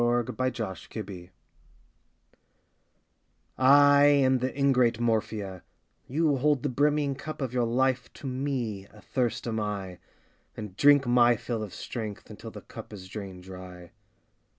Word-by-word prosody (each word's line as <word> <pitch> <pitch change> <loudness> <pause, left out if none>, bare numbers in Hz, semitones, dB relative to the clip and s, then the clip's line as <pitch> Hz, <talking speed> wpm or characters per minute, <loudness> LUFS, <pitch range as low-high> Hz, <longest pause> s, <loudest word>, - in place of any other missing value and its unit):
DAY 120 +2 +1
DREAMS 110 -7 -6
MORPHIA 95 -5 -7 2.3
I 145 +2 +7
am 135 -3 +4
The 130 +1 -1
Ingrate 125 -4 +3
Morphia, 110 -5 -1 0.5
You 150 +1 +1
hold 145 0 +2
the 145 - 0
brimming 145 +2 +1
cup 155 +3 -7
of 130 -3 -3
your 120 -2 +1
L 120 +3 -1
ife 130 -2 0
To - - -12
me, 125 -7 -3
athirst 110 +1 -3
am 110 -1 -1
I, 100 -4 -4 0.6
And 105 -4 -7
drink 145 +3 +5
my 120 -1 +5
fill 115 0 -4
Of 105 -4 -6
strength, 110 -4 -6
until - - -9
The - - -10
cup - - -11
is 95 -3 -9
drained 95 -3 -8
dry. 90 -2 -10
120 Hz, 140 wpm, -28 LUFS, 105-135 Hz, 2.3 s, I